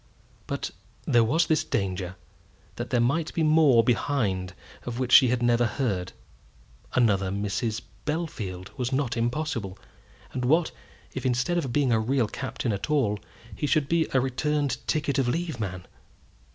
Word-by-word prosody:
But - - -3 0.3
there 120 -1 +4
was 160 +10 +2
this 155 - +2
danger, 95 -1 -2 0.6
that - - -4
there 120 - +2
might 140 +7 +1
be 165 - +1
more 155 -6 +5
behind 105 -7 0 0.3
of 120 -1 -5
which 130 -1 -2
she 130 - +9
had 120 0 0
never 120 0 +3
heard. 105 -7 -2 0.8
Another 100 -6 +3
Mrs. 105 +3 -2 0.2
Bellfield 105 - -4
was 125 0 -1
not 130 -3 0
impossible; 120 -5 -2 0.6
and 125 - -2
what, 155 +6 +3 0.4
if - - -4
instead 130 +8 +1
of 135 -7 -3
being 135 0 +2
a 110 - +3
real 120 +1 +1
captain 120 -1 -3
at 100 +8 -4
all, 120 -9 +1 0.4
he 150 - -2
should 150 -2 +2
be 165 +1 +2
a 130 - +3
returned 135 +1 0
ticket 145 -2 0
of 130 - +1
leave 160 0 -2
man! 95 -4 -4
125 Hz, 155 wpm, -26 LUFS, 110-145 Hz, 0.8 s, she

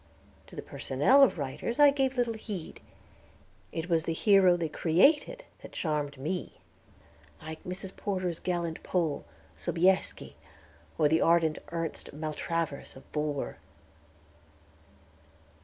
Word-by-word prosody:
To - - -13
the - - -6
personnel 150 - +3
of 275 - +5
writers 145 - -3
I 290 -1 +7
gave 270 -2 0
little 240 -2 +1
heed; 210 -6 -7 0.9
it 165 +1 -4
was 165 -3 +2
the 165 - -1
hero 190 -1 +5
they 170 -2 -1
created 285 - +2 0.2
that - - -11
charmed 150 -3 -2
me, 165 +7 -4 0.9
like 160 0 -8
Miss 180 +2 -6
Porter's 185 -4 -2
gallant 170 -3 -2
Pole, 160 - -1 0.3
Sobieski, 180 - 0 0.6
or 155 - +4
the 160 +2 +2
ardent 165 -2 +3
Ernest 165 -3 -4
Maltravers, 155 0 -3
of 130 - -15
Bulwer. 150 -2 -2
170 Hz, 120 wpm, -29 LUFS, 155-190 Hz, 0.9 s, I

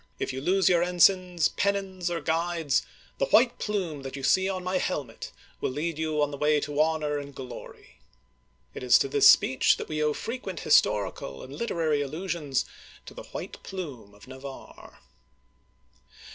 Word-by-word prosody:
If - - -3
you 130 - -5
lose 185 +5 +2
your 175 -2 +4
ensigns, 180 -2 +3
pen 200 0 +1
nons, 190 -3 -4
or 170 -1 -2
guides, 165 -3 0 0.4
the - - +1
white 240 - +4
plume 185 -9 -2
that 135 0 -7
you 135 - -7
see 190 +7 +3
on 185 -1 -3
my 185 +1 0
hel 180 -6 -1
met 115 -3 -10 0.3
will - - -1
lead 155 +4 -3
you 155 -2 0
on 145 - -1
the 140 - -7
way 150 0 +3
to 145 +1 0
honor 155 -2 0
and 140 -1 -9
glory! 130 -3 -10 0.3
" 65 0 -41
It - - -7
is 125 -1 +6
to - - 0
this 140 +1 +6
speech 130 - +4
that - - -6
we 155 -1 -3
owe 150 0 +2
frequent 215 -6 -5
historical 100 -9 +1
and 130 - -10
literary 160 -9 0
allusions 155 -1 -2 0.4
to - - -10
"the - - -10
white - - -8
plume 135 - -8
of 100 +2 -17
Navarre." 130 +1 -11
155 Hz, 180 wpm, -27 LUFS, 135-180 Hz, 0.4 s, is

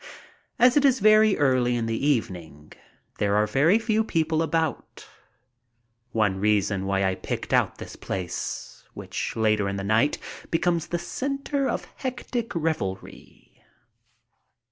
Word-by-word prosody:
As 250 0 +5
it 290 - +4
is 265 -2 +4
very 215 0 +5
early 130 -3 +2
in 115 -1 -1
the 115 +2 -2
evening, 85 - -3 0.5
there 100 -1 +1
are 105 0 +3
very 145 - +3
few 220 -1 +1
people 160 -5 0
about, 160 -1 -2 1.0
one 105 -5 +1
reason 100 -1 +1
why 95 0 +1
I 95 -1 +1
picked - - -5
out - - +2
this - - -9
place, 90 -3 -5
which - - -5
later 110 -2 +1
in 100 - -3
the 100 - -4
night 110 +8 +2 0.3
becomes 170 0 0
the 175 - -2
center 275 - -2
of - - -3
hectic 245 -3 -4
revelry. 150 - -5
135 Hz, 135 wpm, -25 LUFS, -, 1.0 s, As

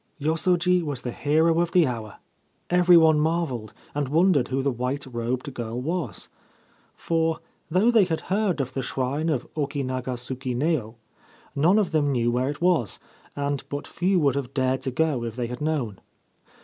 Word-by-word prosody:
Yosoji 175 +4 +2
was 145 -6 -3
the 120 - -3
hero 160 +5 +2
of 170 -1 0
the 180 -3 +5
hour. 115 -5 -4 0.6
Every 180 0 +6
one 160 -2 +5
marvelled, 155 -9 -1 0.2
and 145 -2 -2
wondered 160 -4 +3
who 135 +1 -1
the 140 - +1
white 125 +4 -3
robed 125 +2 -3
girl 120 -1 -4
was; 165 +6 -3 0.7
for, 165 -1 0 0.3
though 190 +8 +3
they 220 -5 +5
had 165 -3 -2
heard 195 -3 0
of 130 -1 -5
the 135 - -2
shrine 135 +5 -1
of 135 -6 -1
Oki 145 -2 -2
naga 130 0 -3
suku 125 +1 -5
neo, 125 -5 0 0.6
none 165 +8 +4
of 200 -6 +1
them 150 -3 +2
knew 120 -2 +1
where 125 +2 0
it 145 - -6
was, 170 - +2 0.4
and 140 -1 -2
but 145 0 -4
few 185 +1 +1
would 140 -4 +3
have 140 -2 -4
dared 130 -1 +1
to - - -2
go 145 -3 0
if 115 -1 -5
they 125 -1 -2
had 125 +2 -6
known. 140 -10 -2
145 Hz, 180 wpm, -25 LUFS, 125-165 Hz, 0.7 s, Every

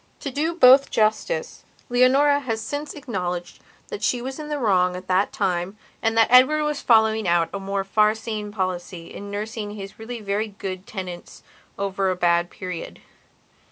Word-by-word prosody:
To 280 - -4
do 315 +5 -1
both 270 -3 +7
justice 470 - -1 0.2
Leonora 270 +4 +4
has 230 -5 -3
since 290 +6 -5
acknowledged 180 - -4 0.3
that 435 - -6
she 245 - +1
was 265 +4 -6
in 300 0 -6
the 295 - -2
wrong 185 -7 +2
at 185 +1 -8
that 185 +2 +2
time 180 +2 -2 0.2
and 225 0 0
that 225 +1 +4
Edward 270 +5 +6
was 300 -1 -2
following 220 -3 +3
out 170 -1 +2
a 200 - -3
more 195 0 -2
far 210 +2 +3
seeing 215 -2 -5
policy 185 -3 -4
in 205 - -8
nursing 210 +1 -5
his 195 0 -9
really 235 +2 -6
very 210 +1 -2
good 195 -2 -7
tenants 185 -4 -8 0.3
over 195 -1 -1
a 185 - 0
bad 175 -1 +2
period. 180 -2 -7
215 Hz, 170 wpm, -23 LUFS, 185-255 Hz, 0.3 s, both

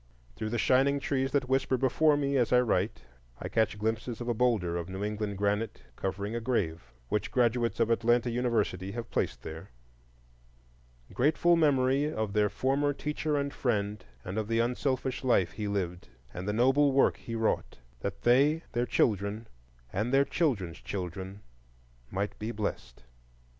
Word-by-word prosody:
Through 110 -1 -3
the 120 - -1
shining 135 +4 +3
trees 135 -1 -1
that 140 -3 +1
whisper 130 0 +1
before 145 +4 +3
me 140 -1 0
as 125 -4 +2
I 125 - +6
write, 125 - 0 0.4
I - - -4
catch 110 -2 +1
glimpses 110 +2 -2
of 120 - -5
a 120 - +1
boulder 110 -8 +1
of 85 0 -4
New 95 +2 -4
England 105 -1 -3
granite, 105 +2 -1
covering 100 +3 -3
a - - 0
grave, 85 - -2 0.2
which 105 0 -1
graduates 120 -2 +1
of 115 - +2
Atlanta 120 +1 +2
University 110 -6 -1
have 115 0 -6
placed - - -1
there,— 80 +5 -8 1.4
"IN - - -16
GRATEFUL 155 +6 +3
MEMORY 140 -2 +3
OF 110 -6 -2
THEIR 105 0 +3
FORMER 140 +4 +1
TEACHER 150 +1 -2
AND 140 0 -2
FRIEND 105 -6 -1 0.2
AND 95 +4 -3
OF 110 - -3
THE 115 0 0
UNSELFISH 130 +2 -1
LIFE 95 -9 +3
HE 105 0 -4
LIVED, 90 -3 -3 0.3
AND 90 +2 -6
THE 105 - 0
NOBLE 135 +5 +4
WORK 135 - +4
HE 115 -3 -6
WROUGHT; 110 -1 -1 0.2
THAT 100 -1 -5
THEY, 145 +7 +4
THEIR 120 +1 0
CHILDREN, 105 +1 0 0.5
AND 110 +5 -1
THEIR 135 +1 +4
CHILDREN'S 105 - -1
CHILDREN 95 +1 -5 0.7
MIGHT 100 +2 -3
BE 110 - -3
BLESSED." 65 - -5
115 Hz, 165 wpm, -29 LUFS, 100-130 Hz, 1.4 s, I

